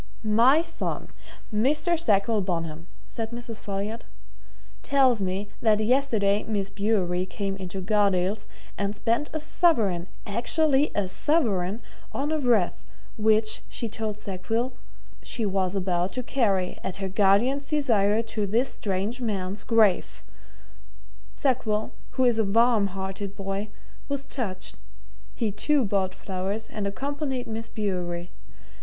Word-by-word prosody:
"My 235 Hz, +9 st, +5 dB
son, 335 Hz, -1 st, -3 dB, 0.4 s
Mr. 300 Hz, +10 st, +2 dB
Sackville 215 Hz, -6 st, +2 dB
Bonham," 165 Hz, -3 st, -3 dB, 0.2 s
said 225 Hz, -1 st, -4 dB
Mrs. 235 Hz, -1 st, -7 dB
Folliot, 205 Hz, +3 st, -4 dB, 0.8 s
"tells 260 Hz, -5 st, +3 dB
me 190 Hz, +2 st, -2 dB
that 215 Hz, -2 st, +4 dB
yesterday 215 Hz, -4 st, +2 dB
Miss 200 Hz, -3 st, -2 dB
Bewery 190 Hz, -3 st, 0 dB
came 195 Hz, +1 st, -3 dB
into 190 Hz, 0 st, -5 dB
Gardales' 200 Hz, 0 st, +1 dB, 0.3 s
and 200 Hz, +1 st, -1 dB
spent 235 Hz, +8 st, 0 dB
a 315 Hz, -, -2 dB
sovereign 225 Hz, -, +2 dB, 0.2 s
actually 275 Hz, +7 st, +3 dB
a 205 Hz, -2 st, +1 dB
sovereign! 210 Hz, -, +1 dB, 0.3 s
on 290 Hz, +3 st, -1 dB
a 315 Hz, -, +1 dB
wreath, 235 Hz, -9 st, +2 dB, 0.3 s
which, 215 Hz, 0 st, +3 dB
she 235 Hz, -, -2 dB
told 215 Hz, -1 st, -4 dB
Sackville, 215 Hz, +5 st, -2 dB, 0.5 s
she 230 Hz, -, -2 dB
was 190 Hz, -1 st, 0 dB
about 180 Hz, -1 st, 0 dB
to 255 Hz, -, -2 dB
carry, 200 Hz, -8 st, 0 dB
at 190 Hz, -, -3 dB
her 195 Hz, -1 st, -3 dB
guardian's 210 Hz, +9 st, +3 dB
desire, 225 Hz, -8 st, +2 dB
to 220 Hz, -2 st, -2 dB
this 235 Hz, +7 st, +1 dB
strange 205 Hz, +5 st, -2 dB
man's 200 Hz, -3 st, -2 dB
grave. 220 Hz, -5 st, +2 dB, 1.1 s
Sackville, 220 Hz, -5 st, 0 dB, 0.3 s
who 260 Hz, -, +4 dB
is 240 Hz, -3 st, +3 dB
a -, -, +4 dB
warm 225 Hz, 0 st, +4 dB
hearted 195 Hz, +1 st, -5 dB
boy, 195 Hz, +1 st, -3 dB, 0.4 s
was 280 Hz, -1 st, -2 dB
touched 195 Hz, -, -4 dB, 0.6 s
he, 220 Hz, -3 st, 0 dB
too, 270 Hz, +6 st, +2 dB
bought 190 Hz, -2 st, 0 dB
flowers 195 Hz, +3 st, -4 dB
and 205 Hz, -2 st, -2 dB
accompanied 270 Hz, +3 st, -3 dB
Miss 225 Hz, 0 st, -5 dB
Bewery. 180 Hz, -4 st, -3 dB
210 Hz, 130 wpm, -26 LUFS, 195-240 Hz, 1.1 s, My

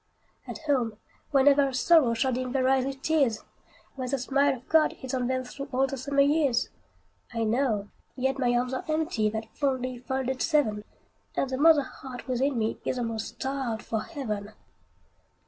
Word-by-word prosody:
At -, -, -5 dB
home, 245 Hz, -7 st, +1 dB, 0.3 s
where 275 Hz, -2 st, +4 dB
never 285 Hz, 0 st, +5 dB
a 270 Hz, -, -4 dB
sorrow 260 Hz, -3 st, +4 dB
Shall 260 Hz, +2 st, +1 dB
dim 255 Hz, 0 st, -3 dB
their 260 Hz, -2 st, +2 dB
eyes 265 Hz, -1 st, +3 dB
with 270 Hz, 0 st, -5 dB
tears! 275 Hz, -9 st, +2 dB, 0.5 s
Where 260 Hz, -2 st, -4 dB
the 275 Hz, -, +1 dB
smile 275 Hz, +2 st, +2 dB
of 250 Hz, -, -19 dB
God 320 Hz, -1 st, +3 dB
is 260 Hz, -, -5 dB
on 250 Hz, -2 st, 0 dB
them 255 Hz, 0 st, -1 dB
Through 275 Hz, +2 st, -8 dB
all 265 Hz, +1 st, +2 dB
the 270 Hz, -, -4 dB
summer 280 Hz, +2 st, +1 dB
years! 280 Hz, -4 st, +2 dB, 0.6 s
I 230 Hz, 0 st, -1 dB
know, 220 Hz, -3 st, 0 dB, 0.3 s
yet 265 Hz, +1 st, -1 dB
my 245 Hz, -2 st, +2 dB
arms 250 Hz, +1 st, 0 dB
are 260 Hz, -, -2 dB
empty, 310 Hz, -9 st, 0 dB
That 220 Hz, +1 st, -6 dB
fondly 255 Hz, -3 st, -1 dB
folded 265 Hz, 0 st, -2 dB
seven, 220 Hz, -10 st, +1 dB, 0.5 s
And 265 Hz, -, -1 dB
the 260 Hz, -, -1 dB
mother 310 Hz, -1 st, +6 dB
heart 260 Hz, -1 st, -9 dB
within 260 Hz, +1 st, 0 dB
me 220 Hz, 0 st, -1 dB
Is -, -, -2 dB
almost 230 Hz, -1 st, -3 dB
starved 265 Hz, -4 st, -3 dB
for 220 Hz, -1 st, -2 dB
heaven. 215 Hz, -10 st, -5 dB
260 Hz, 180 wpm, -27 LUFS, 240-275 Hz, 0.6 s, mother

